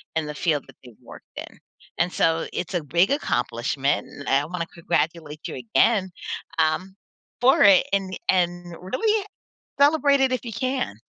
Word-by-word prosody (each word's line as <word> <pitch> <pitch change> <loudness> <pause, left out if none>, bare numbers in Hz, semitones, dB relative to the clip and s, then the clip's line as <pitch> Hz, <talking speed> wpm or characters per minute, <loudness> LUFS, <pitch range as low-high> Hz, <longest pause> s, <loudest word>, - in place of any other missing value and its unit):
in 160 -1 0
the 150 - -6
field 150 -3 0
that - - -16
they've 120 -2 -14
worked - - -13
in. - - -9 0.4
And 175 +1 +1
so 165 0 +1
it's 180 +1 -4
a 175 -3 -1
big 170 - +2
accomplishment 130 - -1
and 140 - -11
I 140 +2 +3
want 175 +1 -5
to 170 - -2
congratulate 160 -2 -2
you - - -6
again, 185 - +2 0.5
um, 185 +5 0 0.5
for 260 +2 +5
it 200 -3 +7
and 195 -1 -1
and 175 -1 0
really 420 - 0 0.5
celebrate 285 -1 +4
it 265 -1 +3
if 255 - -2
you 230 - -6
can. 255 - -2
175 Hz, 165 wpm, -24 LUFS, 150-225 Hz, 0.5 s, it